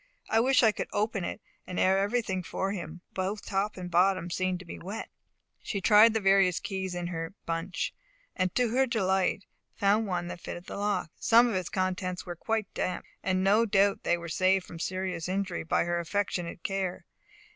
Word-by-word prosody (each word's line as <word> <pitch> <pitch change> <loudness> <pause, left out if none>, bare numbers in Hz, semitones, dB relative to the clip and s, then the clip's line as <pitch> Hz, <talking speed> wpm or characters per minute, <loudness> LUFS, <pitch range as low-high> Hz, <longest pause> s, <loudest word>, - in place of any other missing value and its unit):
I 225 - +5
wish 255 +2 +4
I 220 - +6
could - - -4
open 210 -2 0
it, - - -4 0.3
and 180 - -5
air 190 +1 +4
everything 200 -2 0
for 190 +2 -2
him; 175 -3 -6
both 195 +3 -3
top 200 +1 -1
and 180 -1 -6
bottom 180 0 +3
seem 185 0 0
to 180 - -11
be 170 - -8
wet." 200 +5 -6 0.5
She 200 - -3
tried 215 +3 +6
the - - +3
various 195 -3 +4
keys 190 -2 -4
in 175 0 -3
her 165 +1 -4
bunch, 165 +2 -2 0.4
and 185 -1 0
to 250 -2 +3
her 260 +3 +2
delight 195 -4 +1 0.3
found 205 +2 +2
one 175 -2 -2
that 175 - -7
fitted 175 - -7
the - - -7
lock. 200 -5 -1
Some 235 +2 +6
of 235 - -1
its 185 -2 -2
contents 185 -1 -2
were 175 -1 -5
quite 220 +3 -2
damp, 185 - -2 0.2
and 185 0 0
no 205 +4 +5
doubt 200 -1 +3
they 175 - +1
were 170 0 -7
saved 185 +2 +2
from 165 - -10
serious 185 -2 -3
injury 190 -2 -2
by 165 - +1
her 175 0 -1
affectionate 175 -1 -2
care. 195 -2 -2
190 Hz, 195 wpm, -29 LUFS, 180-205 Hz, 0.5 s, I